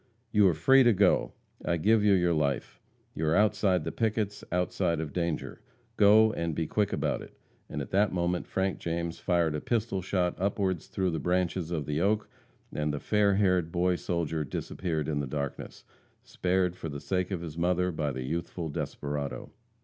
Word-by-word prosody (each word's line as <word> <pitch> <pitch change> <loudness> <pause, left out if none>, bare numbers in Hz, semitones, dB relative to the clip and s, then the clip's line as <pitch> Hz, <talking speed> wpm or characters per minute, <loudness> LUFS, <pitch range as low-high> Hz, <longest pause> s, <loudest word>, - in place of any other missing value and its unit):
"You 105 -3 +5
are 85 - +2
free 135 - +5
to 120 -3 +5
go! 100 -1 +3 0.3
I 85 - 0
give 105 +5 +3
you 105 -1 +5
your 90 -2 +3
life. 70 -4 -1 0.3
You 80 - -2
are 80 - +3
outside 105 -3 +3
of - - -7
the - - -3
pickets, 110 -2 -1
outside 90 -1 0
of 80 -2 -4
danger. 85 -3 -3 0.3
Go, 110 +1 +6
and 85 -2 -2
be 80 - -1
quick 105 +5 0
about - - -1
it!" - - -13 0.3
And - - -3
at - - -11
that 100 +2 +3
moment 90 0 -1
Frank 95 0 -1
James 85 0 -3
fired 85 -3 +1
a 75 - -3
pistol 110 -5 -1
shot 90 -1 0
upward 95 -3 0
through 95 -2 -2
the 80 - -2
branches 90 0 0
of 80 -4 -2
the 75 +2 -1
oak, 105 +3 +1 0.5
and 75 0 -1
the 75 - -3
fair 105 +1 +2
haired 90 -4 +2
boy 90 +1 +2
soldier 80 -3 -2
disappeared 80 +2 -3
in 75 -2 -1
the 70 - -2
darkness 70 0 -5 0.4
spared 90 -1 0
for 80 - -6
the 70 -1 -5
sake 90 +3 -1
of 95 -4 -3
his 80 -3 -7
mother 90 +2 +1
by 75 -3 -2
the 65 -1 -4
youthful 85 +3 -4
desperado. 70 -1 -4
90 Hz, 190 wpm, -29 LUFS, 80-95 Hz, 0.5 s, Go